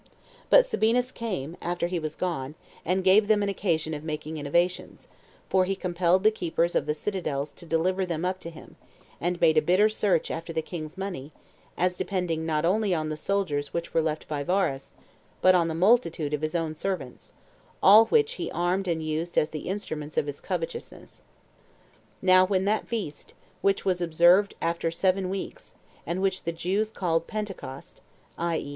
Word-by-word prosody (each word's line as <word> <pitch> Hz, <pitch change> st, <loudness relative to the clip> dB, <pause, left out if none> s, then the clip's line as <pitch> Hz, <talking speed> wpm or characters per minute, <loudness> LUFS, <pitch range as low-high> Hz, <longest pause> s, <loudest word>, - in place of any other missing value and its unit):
But -, -, +7 dB
Sabinus 250 Hz, -, +1 dB
came, 185 Hz, -, -4 dB
after 175 Hz, 0 st, -1 dB
he 175 Hz, 0 st, -2 dB
was 155 Hz, -1 st, -5 dB
gone, 155 Hz, -6 st, -3 dB, 0.3 s
and 185 Hz, +3 st, 0 dB
gave 200 Hz, +3 st, +5 dB
them 210 Hz, -1 st, +3 dB
an 200 Hz, -, 0 dB
occasion 160 Hz, -5 st, -1 dB
of 150 Hz, 0 st, -5 dB
making 155 Hz, 0 st, -5 dB
innovations; 170 Hz, +5 st, -1 dB, 0.4 s
for 185 Hz, -1 st, +3 dB
he 195 Hz, +1 st, -1 dB
compelled 180 Hz, 0 st, +1 dB
the 215 Hz, -, +6 dB
keepers 170 Hz, -4 st, -1 dB
of 145 Hz, -, 0 dB
the 150 Hz, -, 0 dB
citadels 150 Hz, -6 st, -3 dB
to 170 Hz, -, -14 dB
deliver 185 Hz, +4 st, +1 dB
them 170 Hz, -2 st, -2 dB
up 185 Hz, +1 st, -1 dB
to 170 Hz, -, -7 dB
him, 165 Hz, -, -14 dB, 0.4 s
and 175 Hz, +1 st, -1 dB
made 160 Hz, -2 st, +4 dB
a -, -, -1 dB
bitter 185 Hz, +7 st, +4 dB
search 200 Hz, -6 st, 0 dB
after 165 Hz, +1 st, -5 dB
the 160 Hz, -1 st, -2 dB
king's 155 Hz, 0 st, -7 dB
money, 180 Hz, -7 st, -5 dB, 0.4 s
as 180 Hz, 0 st, +1 dB
depending 170 Hz, -4 st, -2 dB
not 155 Hz, 0 st, 0 dB
only 200 Hz, +1 st, +2 dB
on 155 Hz, -1 st, -2 dB
the 155 Hz, -, -3 dB
soldiers 155 Hz, -4 st, -2 dB
which 170 Hz, 0 st, -3 dB
were 165 Hz, -, +3 dB
left 155 Hz, -1 st, -3 dB
by 145 Hz, -1 st, -3 dB
Varus, 160 Hz, -4 st, -1 dB, 0.4 s
but 185 Hz, -, +6 dB
on 175 Hz, -2 st, +3 dB
the 160 Hz, -, -3 dB
multitude 170 Hz, -6 st, +2 dB
of 150 Hz, -, -1 dB
his 155 Hz, +2 st, -2 dB
own 165 Hz, -2 st, -1 dB
servants, 155 Hz, -6 st, -5 dB, 0.5 s
all 215 Hz, +4 st, +9 dB
which 445 Hz, 0 st, +3 dB
he -, -, -2 dB
armed 180 Hz, +3 st, 0 dB
and 165 Hz, -2 st, -1 dB
used 155 Hz, +2 st, -3 dB
as 150 Hz, -, +2 dB
the 155 Hz, +2 st, -5 dB
instruments 155 Hz, -7 st, -5 dB
of -, -, +2 dB
his 145 Hz, -1 st, -6 dB
covetousness. 175 Hz, -4 st, -6 dB, 1.0 s
Now 185 Hz, 0 st, +6 dB
when 190 Hz, 0 st, +1 dB
that 215 Hz, +2 st, 0 dB
feast, 205 Hz, -11 st, -5 dB, 0.3 s
which 195 Hz, 0 st, +1 dB
was 180 Hz, -2 st, +1 dB
observed 175 Hz, +4 st, +4 dB
after 170 Hz, 0 st, 0 dB
seven 185 Hz, +2 st, 0 dB
weeks, 195 Hz, -, -6 dB, 0.3 s
and 180 Hz, +3 st, -2 dB
which 190 Hz, -1 st, 0 dB
the 170 Hz, -, -1 dB
Jews 190 Hz, +6 st, -1 dB
called 165 Hz, -5 st, -1 dB
Pentecost, 195 Hz, -11 st, -7 dB, 0.4 s
[i. 170 Hz, -1 st, 0 dB
e. 140 Hz, -, -5 dB
175 Hz, 185 wpm, -27 LUFS, 160-190 Hz, 1.0 s, all